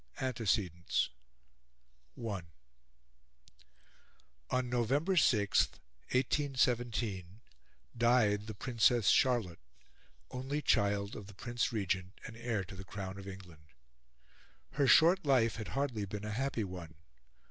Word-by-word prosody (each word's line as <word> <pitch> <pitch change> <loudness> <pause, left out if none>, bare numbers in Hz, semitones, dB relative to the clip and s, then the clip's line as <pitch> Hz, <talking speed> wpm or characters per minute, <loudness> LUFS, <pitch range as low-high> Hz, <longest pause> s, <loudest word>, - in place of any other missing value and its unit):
ANTECEDENTS 105 - 0 1.1
I 105 -5 -3 2.1
On 130 -1 0
November 135 - +1
6, 105 - +4 0.4
1817, 120 -7 0 0.5
died 115 -3 +3
the 110 - -6
Princess 115 -1 +3
Charlotte, 120 -10 +2 0.7
only 135 +3 -3
child 100 -6 +1
of 105 - -8
the 105 - -13
Prince 120 +4 -2
Regent, 95 -3 -2
and 115 - -8
heir 115 -4 -2
to 95 - -10
the 95 - -8
crown 95 0 -6
of 100 - -10
England. 90 -5 -11 1.0
Her 140 -1 +1
short 170 +8 +6
life 125 -6 +3
had 110 - -5
hardly 125 -7 -1
been 105 +2 -6
a 105 - -4
happy 125 0 -1
one. 90 -4 -8
110 Hz, 110 wpm, -33 LUFS, 100-125 Hz, 2.1 s, short